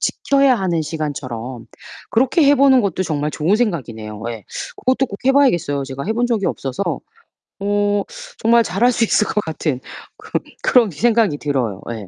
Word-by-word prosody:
지켜야 275 -2 +2
하는 180 -4 0
시간처럼 130 -6 -5 0.4
그렇게 260 +7 +3
해 285 - +6
보는 265 -1 +5
것도 190 -2 -1
정말 150 -2 -1
좋은 175 +8 +1
생각이네요. 115 - -3
예. 115 -3 -8 0.3
그것도 260 +1 +1
꼭 200 - -8
해 270 - +5
봐야겠어요. 175 - +2
제가 135 +1 -6
해 220 - +1
본 240 +1 +1
적이 220 -6 0
없어서 135 +7 -3 0.8
어 205 0 +1 0.4
정말 235 +1 +4
잘 195 +4 -2
할 250 - +6
수 235 -1 +2
있을 210 - +2
것 - - -4
같은 155 -4 -2 0.4
그런 - - -4 0.2
그런 235 -7 +4
생각이 220 -2 +2
들어요. 125 -9 -2
예. 110 -4 -7
185 Hz, 340 characters per minute, -19 LUFS, -, 0.8 s, 해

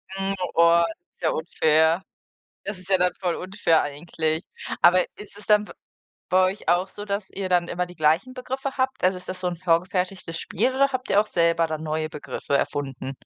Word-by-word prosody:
Mhm. 195 0 -1 0.2
Boah, 170 0 +5 0.3
ist - - -33
ja 160 - +3
unfair. 160 +1 +2 0.6
Das 200 -1 -4
ist 185 0 -11
ja 190 -1 +4
dann 180 0 +3
voll 180 -2 0
unfair 185 -4 +1
eigentlich. 155 +2 -2 0.4
Aber 180 0 +6
ist 205 -1 -12
es 205 - -12
dann 210 -1 +5
b - - -11 0.6
bei 185 0 +4
euch 195 - -10
auch 175 +3 +2
so, 205 - -8
dass 200 -1 -3
ihr 190 -1 -5
dann 175 -1 +2
immer 180 +1 -1
die 180 - -12
gleichen 160 +10 +2
Begriffe 265 +2 -5
habt? 260 -2 -1
Also, 185 0 +3
ist 180 - -7
das 185 0 -4
so 180 - 0
'n 175 - -4
vorgefertigtes 180 0 -1
Spiel 250 +7 0
oder 275 +1 +4
habt 255 -1 -4
ihr 205 - +5
auch 215 - -1
selber 170 -3 +2
dann 155 -1 -4
neue 155 0 -2
Begriffe 145 -2 -3
erfunden? 135 -2 -3
180 Hz, 205 wpm, -24 LUFS, 165-200 Hz, 0.6 s, Aber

